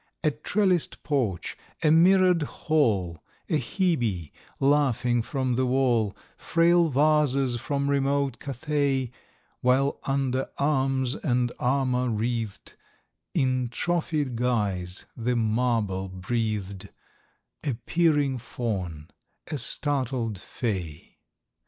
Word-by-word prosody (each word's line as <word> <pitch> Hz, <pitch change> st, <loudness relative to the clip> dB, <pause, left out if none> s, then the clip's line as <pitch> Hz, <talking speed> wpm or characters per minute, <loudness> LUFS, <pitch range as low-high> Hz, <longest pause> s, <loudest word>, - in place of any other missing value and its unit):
A 155 Hz, -, +3 dB
trelliss'd 185 Hz, +1 st, 0 dB
porch, 120 Hz, -, -1 dB, 0.3 s
a 155 Hz, -, +5 dB
mirror'd 180 Hz, +1 st, +5 dB
hall, 110 Hz, -, 0 dB, 0.3 s
A 155 Hz, -, +2 dB
Hebe, 120 Hz, -, -1 dB, 0.3 s
laughing 135 Hz, -4 st, +2 dB
from 130 Hz, +1 st, -1 dB
the 130 Hz, +1 st, +1 dB
wall, 125 Hz, -5 st, +1 dB, 0.2 s
Frail 170 Hz, 0 st, +3 dB
vases 140 Hz, -3 st, +2 dB
from 140 Hz, +4 st, -1 dB
remote 140 Hz, -2 st, +1 dB
Cathay,— 140 Hz, -2 st, -1 dB, 0.5 s
While, 130 Hz, +3 st, +2 dB
under 135 Hz, -1 st, 0 dB
arms 135 Hz, -3 st, +1 dB
and 125 Hz, -4 st, 0 dB
armour 125 Hz, -1 st, +1 dB
wreath'd 115 Hz, -1 st, -3 dB, 0.6 s
In 130 Hz, -2 st, +1 dB
trophied 150 Hz, -2 st, -1 dB
guise, 100 Hz, -7 st, -1 dB
the 120 Hz, +1 st, -1 dB
marble 110 Hz, -4 st, 0 dB
breath'd— 100 Hz, 0 st, -3 dB, 0.7 s
A 140 Hz, -5 st, -1 dB
peering 150 Hz, -6 st, +2 dB
fawn, 95 Hz, -10 st, -4 dB, 0.4 s
a 150 Hz, -, -2 dB
startled 130 Hz, -5 st, 0 dB
fay. 90 Hz, -, -5 dB
130 Hz, 95 wpm, -26 LUFS, 115-145 Hz, 0.7 s, a